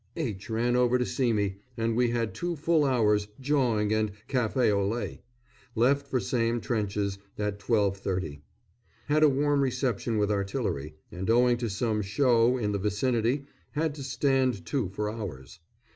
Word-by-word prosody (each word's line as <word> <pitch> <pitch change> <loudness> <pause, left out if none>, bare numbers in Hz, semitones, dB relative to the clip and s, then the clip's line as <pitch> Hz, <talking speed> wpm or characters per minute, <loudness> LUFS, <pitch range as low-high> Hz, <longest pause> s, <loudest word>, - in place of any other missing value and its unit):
_ - - -39 0.2
H. 110 - -4
ran 120 +2 +1
over 125 0 +3
to 125 - 0
see 125 -2 0
me, 100 -3 0 0.2
and 115 0 0
we 125 0 +3
had 115 -2 -1
two 175 -1 -3
full 160 0 +2
hours' 105 -6 +2
"jawing," 125 -7 +1
and 110 -1 +1 0.2
café 125 -2 +1
au 100 -1 +1
lait. 115 +4 -3 0.5
Left 140 +5 +2
for 130 -2 0
same 115 +2 0
trenches 105 -4 -2 0.2
at 105 -1 -2
12.30. 95 -8 -1 0.7
Had 150 +1 +3
a 155 - +7
warm 145 +1 +2
reception 125 -4 0
with 105 0 +1
artillery, 95 -7 -2 0.2
and 95 +3 -4
owing 120 +1 +4
to 120 -1 -2
some 110 +1 0
"show" 120 +3 +3
in 105 -4 -1
the 100 - -1
vicinity 115 +6 0 0.3
had 155 0 0
to 145 - -9
stand 130 - +1
to 120 -2 -1
for 105 +2 -3
hours. 95 - -7
115 Hz, 165 wpm, -28 LUFS, 105-130 Hz, 0.7 s, a